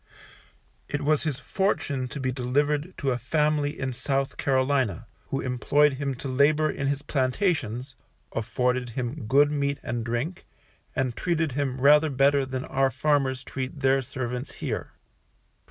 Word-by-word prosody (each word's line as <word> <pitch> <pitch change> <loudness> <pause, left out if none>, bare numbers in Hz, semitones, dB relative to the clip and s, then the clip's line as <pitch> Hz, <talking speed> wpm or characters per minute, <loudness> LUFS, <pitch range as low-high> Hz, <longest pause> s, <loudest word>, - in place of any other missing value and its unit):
It 145 - -2
was 150 +1 +3
his 145 -5 -1
fortune 140 -6 -1
to 140 - -7
be 130 -1 -1
delivered 145 +6 0
to 135 -1 0
a 125 - -1
planter 150 +3 +1
in 130 -3 -3
South 135 +2 -1
Carolina, 130 -5 +1 0.2
who 135 - -2
employed 140 +3 +2
him 140 -2 -1
to 130 - -6
labour 150 +4 +3
in 140 - -3
his 140 0 -1
plantations, 130 - 0 0.4
afforded 125 +2 0
him 125 0 -3
good 145 +5 +5
meat 140 -1 0
and 120 -1 -2
drink, 120 +10 -3 0.5
and 130 -3 0
treated 165 -4 0
him 130 -1 -2
rather 150 +3 +6
better 140 0 +3
than 130 0 -4
our 135 0 +2
farmers 130 0 +1
treat 135 +1 -5
their 135 0 +4
servants 130 0 -4
here. - - -4
135 Hz, 150 wpm, -26 LUFS, 130-145 Hz, 0.5 s, rather